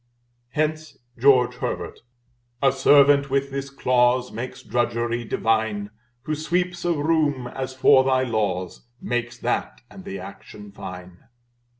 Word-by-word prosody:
Hence 155 0 -2 0.2
George 125 0 +4
Herbert - - -4 0.6
"A 135 -1 +4
servant 140 +1 +5
with 140 +1 0
this 140 0 -4
clause 125 -2 +2
Makes 120 +3 -7
drudgery 120 +1 -1
divine; 110 -2 -1 0.3
Who 155 - -3
sweeps 175 +3 -1
a 175 -1 +1
room, 150 -4 +1
as 130 +1 -5
for 130 0 +5
thy 130 -1 +2
laws, 105 -4 -2
Makes 120 0 -3
that - - -2
and 190 - -11
the 195 0 -6
action 105 - -11
fine." 90 -2 -10
130 Hz, 125 wpm, -23 LUFS, 115-145 Hz, 0.6 s, servant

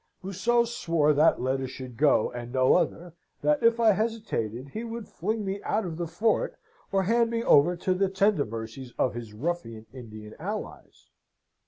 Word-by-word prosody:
Museau 210 +6 +1
swore 165 -9 +1
that 150 +3 +4
letter 130 +1 -1
should 130 -1 -9
go, 140 -3 +3
and 120 0 -7
no 130 0 +4
other; 175 -1 0 0.3
that 300 -2 +2
if 230 0 +4
I 225 -2 +6
hesitated, 195 - -2
he 220 +10 -5
would 230 -1 -6
fling 215 +4 -3
me 195 +1 -3
out 215 -1 -1
of 165 -3 -5
the 170 -1 -3
fort, 220 - 0 0.3
or 195 -1 +2
hand 230 +4 +2
me 230 0 -1
over 170 +1 +5
to 185 +2 0
the 190 +1 +1
tender 195 -4 +2
mercies 115 +3 -7
of 125 - +1
his 120 -2 -7
ruffian 115 -4 -4
Indian 110 -4 -10
allies. 205 +6 -7
175 Hz, 175 wpm, -27 LUFS, 130-215 Hz, 0.3 s, I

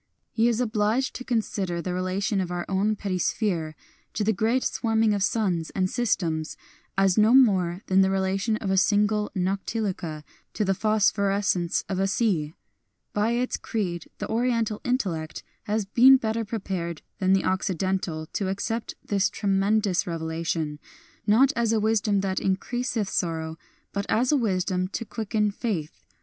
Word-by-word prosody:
He 225 +1 +2
is 235 -1 +1
obliged 225 +2 +1
to 255 - -6
consider 205 -7 -1
the 180 +1 -3
relation 190 +3 -1
of 180 - -3
our 175 -1 -3
own 200 +3 +1
petty 195 -3 -3
sphere 165 -5 -1 0.4
to 210 - 0
the 220 +2 +2
great 225 +6 +1
swarming 225 -2 +1
of 200 - -1
suns 190 -6 0
and 185 -1 0
systems 170 -10 -1 0.4
as 195 0 +3
no 220 +4 +5
more 190 -8 +4
than 190 0 +4
the 190 - +3
relation 195 +3 0
of 195 -3 -3
a 190 - +2
single 210 +1 +2
noctiluca 185 -4 -2 0.3
to 210 - 0
the 195 - +2
phosphorescence 200 -3 +1
of 190 -1 -2
a 195 - +2
sea. 185 -8 0 0.6
By 215 +3 +1
its 250 +1 -1
creed 175 -7 -3
the - - -4
Oriental 230 -2 0
intellect 180 -11 -2 0.2
has 210 0 0
been 250 +6 +7
better 225 -1 -1
prepared 190 -6 -4 0.2
than 190 -1 +3
the 195 - +2
Occidental 185 -3 -1
to 195 - -1
accept 225 +4 -3
this 200 -1 +1
tremendous 200 -1 +1
revelation, 160 -2 -3 0.5
not 255 +7 +5
as 230 -1 +1
a 225 - +2
wisdom 210 -2 +2
that 190 -1 -1
increaseth 220 +3 -1
sorrow, 160 -3 -2 0.4
but 200 0 -2
as 245 +4 +2
a - - +4
wisdom 185 -6 0
to 230 +5 -5
quicken 215 -1 -1
faith. 195 -8 -4
200 Hz, 155 wpm, -26 LUFS, 185-220 Hz, 0.6 s, been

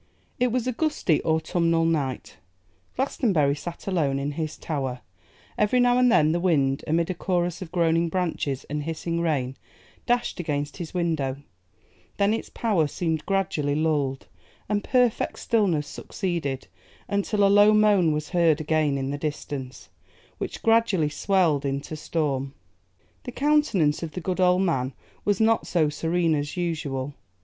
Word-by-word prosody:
IT 250 - +3
WAS 250 0 0
a 255 - 0
gusty 255 - 0
autumnal 165 +1 +1
night; 145 -6 -2 0.6
Glastonbury 200 - +1
sat 170 +3 -8
alone 155 -8 0
in 140 +1 -2
his 155 +1 -4
tower; 135 -5 -3 0.6
every 210 +4 +3
now 245 0 +4
and 250 -1 +5
then 155 -9 +4
the 170 - 0
wind, 140 -7 +1
amid 165 +3 +1
a - - -1
chorus 175 -1 -1
of 170 -3 -7
groaning 170 -1 +2
branches 160 -6 -2
and 150 +1 -4
hissing 165 +2 -3
rain, 135 -6 -1 0.5
dashed 240 -4 0
against 145 -4 -3
his 170 0 -7
window; 155 -7 -1 0.8
then 200 +1 +3
its 225 - -4
power 200 -10 +1
seemed 160 0 -2
gradually 160 -7 0
lulled, 145 -4 0 0.4
and 205 0 0
perfect 250 -3 +1
stillness 195 - +1
succeeded, 155 -6 -4 0.4
until 200 +1 0
a - - +6
low 205 +1 +6
moan 210 -6 +4
was 150 0 -3
heard 170 -3 +3
again 155 -2 +1
in 135 0 -2
the 145 - -4
distance, 140 -6 -5 0.5
which - - -5
gradually 225 -9 +3
swelled 160 -2 +1
into 140 +2 -3
storm. 140 -3 -2 0.7
The - - -5
countenance 275 - +2
of 165 -2 -5
the - - -4
good 185 +2 -2
old 180 +1 +4
man 135 -7 0 0.3
was 205 -2 +1
not 225 0 +2
so 160 -4 +2
serene 165 +2 0
as 145 +2 -2
usual. 145 -6 -2
165 Hz, 150 wpm, -25 LUFS, 145-195 Hz, 0.8 s, a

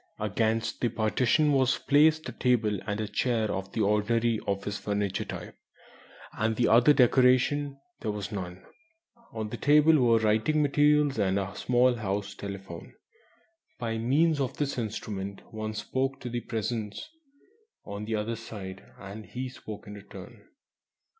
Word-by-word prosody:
Against 110 +2 -1
the 120 - +2
partition 120 +7 +2
was 130 -1 +3
placed 155 +2 +3
a - - -4
table 110 -5 +1
and 105 0 -2
a 110 - -2
chair 110 +1 0
of 95 +1 -4
the 110 - -1
ordinary 110 +2 +2
"office 100 +1 -2
furniture" 100 -2 -2
type; - - -7 0.8
and 110 +2 0
other 120 +6 +6
decoration 130 +2 +3 0.2
there 110 - -3
was 105 0 -4
none. 90 -3 -6 0.7
On 110 -1 -4
the - - -5
table 150 +2 +5
were 120 -2 +4
writing 110 +8 +2
materials, 145 -2 +3
and 95 -1 +2
a 100 +1 -3
small 125 0 +3
house 100 -2 -3
telephone. 95 -4 -8 0.8
By 115 0 -3
means 145 +7 +2
of 135 -2 -2
this 145 -1 -1
instrument 100 -3 -5
one 110 0 -4
spoke 135 +4 -2
to 125 - -5
the 120 0 -2
Presence 110 - -4 0.8
on 100 +1 -6
the 110 +1 -1
other 110 +2 -2
side, 100 -4 -8 0.2
and 100 +2 -8
he 125 +4 -5
spoke 110 -4 -9
in 105 - -9
return. 100 +2 -12
110 Hz, 145 wpm, -28 LUFS, 105-125 Hz, 0.8 s, other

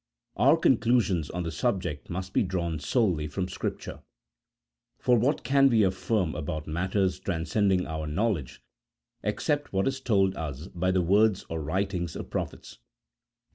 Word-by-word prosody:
Our - - +5
conclusions 105 -10 +2
on 90 - -3
the 85 - -3
subject 90 - -2
must 95 +2 -5
be - - +3
drawn 85 -5 -2
solely 85 - +1
from 90 +5 -3
Scripture; - - -5 1.0
for 125 - +3
what 125 +6 +1
can 135 0 +4
we 115 -4 +4
affirm 95 -1 0
about 75 0 -4
matters 95 +3 0
transcending 95 +1 0
our 80 -1 -4
knowledge 85 - -2 0.6
except 145 0 -1
what 95 0 +1
is 135 0 -2
told 95 -6 +2
us 75 -1 -5
by 90 +1 -1
the 95 -1 +2
words 100 +3 +3
or 80 -1 -3
writings 85 +1 -2
of - - -7
prophets - - -5
95 Hz, 145 wpm, -27 LUFS, 80-105 Hz, 1.0 s, Our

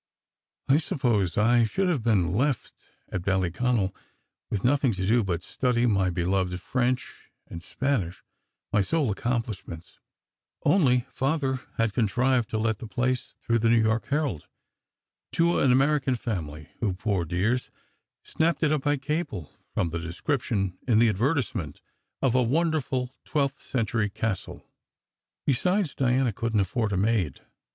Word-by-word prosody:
I 135 - +5
suppose 120 - 0
I 120 +3 +4
should 190 - 0
have 165 -8 +1
been 100 -7 +2
left 130 +4 0 0.4
at 95 - -3
Ballyconal, 95 +3 0 0.6
with 100 - -2
nothing 135 -1 +3
to 95 -1 -3
do 115 +3 +3
but 90 -3 -2
study 125 +1 0
my 100 -5 +2
beloved 90 +1 0
French 125 +4 -2 0.2
and 85 - -8
Spanish, 105 -4 -2 0.5
my 105 - +4
sole 145 +3 +1
accomplishments; 110 -6 -4 0.6
only 135 -7 +3
Father 135 -1 0 0.2
had 115 -2 +1
contrived 125 +2 +1
to 110 - -1
let 110 -1 0
the 115 - -7
place, 125 +4 -1
through 115 0 +2
the 115 +1 +2
New 115 0 +5
York 110 +1 +1
Herald, 145 - -1 0.9
to 170 +1 +3
an 135 - +4
American 135 0 +3
family 80 -9 -5
who, 105 -5 0
poor 95 -2 0
dears, 95 +10 0 0.5
snapped 165 +1 0
it 155 - +3
up 155 -2 +1
by 145 +1 +1
cable 145 - -3 0.2
from 85 - 0
the 85 - -2
description 95 - -2
in 115 -4 +4
the 115 0 +5
advertisement 110 - -1 0.4
of 130 -3 +3
".a 130 - +4
wonderful 135 -2 0 0.2
XII 140 -3 +2
Century 110 -3 -1
Castle." 105 -1 -4 0.8
Besides, 180 - +1
Diana 130 -2 +1
couldn 115 +1 -1
t 100 - +4
afford 110 +3 -1
a 95 - 0
maid. 95 - 0
115 Hz, 145 wpm, -26 LUFS, 95-135 Hz, 0.9 s, I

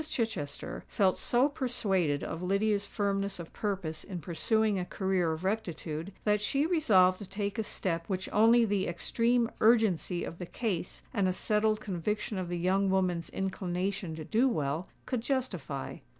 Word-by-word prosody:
Chichester 185 - -3
felt 190 -2 +2
so 250 +3 +3
persuaded 205 - 0
of 165 - -4
Lydia's 200 +2 +1
firmness 200 -1 -1
of 170 -2 -9
purpose 190 -7 -3
in 185 -3 -6
pursuing 200 +6 +1
a - - -1
career 185 -3 0
of 160 +2 -4
rectitude, 180 -4 -3
that 210 -1 +2
she 275 +8 +1
resolved 200 - +4
to 200 -3 -9
take 200 +1 -3
a - - +1
step 170 -5 -2
which 190 -1 -2
only 230 +2 +6
the 200 -2 0
extreme 230 +7 +1
urgency 215 -6 +3
of 165 - -6
the 180 - -5
case 190 -6 -3
and 200 -3 +2
a 185 - +1
settled 215 +2 +1
conviction 210 +1 -2
of 180 -2 -4
the 175 - -2
young 190 +3 +2
woman's 180 -3 +1
inclination 190 -2 -2
to 155 -1 -7
do 235 - +3
well, 155 - -1 0.2
could 250 -3 -1
justify. 185 - -3
195 Hz, 165 wpm, -30 LUFS, 175-220 Hz, 0.2 s, only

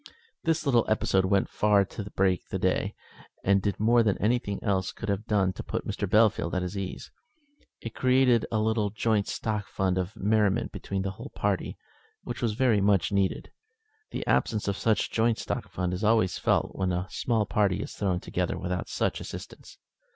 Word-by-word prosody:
This 165 0 +1
little 120 -5 +4
episode 95 -3 +2
went 95 +1 +2
far 105 -2 +3
to 100 +1 -7
break 95 -2 +1
the - - -2
day, - - 0 0.5
and 100 0 +3
did 100 +1 -2
more 115 +3 +4
than 105 -4 +1
anything 105 -2 0
else 95 -3 0
could 110 - -6
have 100 +2 -2
done 95 -3 +2
to - - -6
put - - -4
Captain - - -3
Bellfield 105 -5 +3
at 90 - 0
his 90 +2 -4
ease. 95 -1 -5 0.7
It 115 - -6
created 130 -3 +3
a 110 - +1
little 110 -1 +1
joint 105 0 0
stock 105 -3 -3
fund 95 +1 0
of 90 +3 -4
merriment 105 -1 +1
between 95 -1 -4
the 95 - -2
whole 95 - -10
party, - - -1 0.5
which - - -6
was 115 -3 +1
very 115 -3 +2
much 100 -1 +2
needed. 100 -1 0 0.6
The - - -4
absence 105 -2 +1
of 100 - 0
such 110 +1 +1
joint 115 0 +2
stock - - -4
fund 90 0 -2
is 90 +4 -4
always 110 -4 +3
felt - - +1
when 95 -1 0
a 90 +1 -1
small 115 -3 0
party 100 -2 +1
is - - -8
thrown 95 -4 -1
together - - -2
without 90 0 -3
such - - -1
assistance. - - -9
100 Hz, 190 wpm, -27 LUFS, 95-110 Hz, 0.7 s, little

